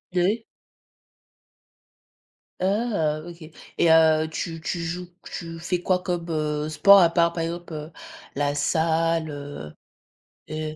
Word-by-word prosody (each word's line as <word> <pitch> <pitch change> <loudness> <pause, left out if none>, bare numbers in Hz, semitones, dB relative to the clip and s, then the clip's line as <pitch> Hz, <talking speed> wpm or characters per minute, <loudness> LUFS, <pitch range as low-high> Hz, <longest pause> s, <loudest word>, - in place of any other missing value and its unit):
Ouais. 205 +6 +1 2.2
Ah! 190 -7 0
OK 175 -1 -11 0.4
et 170 - +4
heu, 160 -1 +5
tu 165 0 -4
tu 170 +2 -3
joues, 175 +2 -4 0.2
tu 165 -1 -7
fais 175 +1 -2
quoi 185 0 +1
comme, 175 -2 -2
heu, 150 -1 -1
sport 200 +6 +7
à 170 -2 +6
part, 170 0 +2
par 165 -1 -3
exemple, 170 +1 -5
heu, 155 +2 -6 0.4
la 145 0 0
salle, 165 +1 +1
heu 145 - -8 0.8
heu 155 0 -4
165 Hz, 130 wpm, -24 LUFS, 155-175 Hz, 2.2 s, sport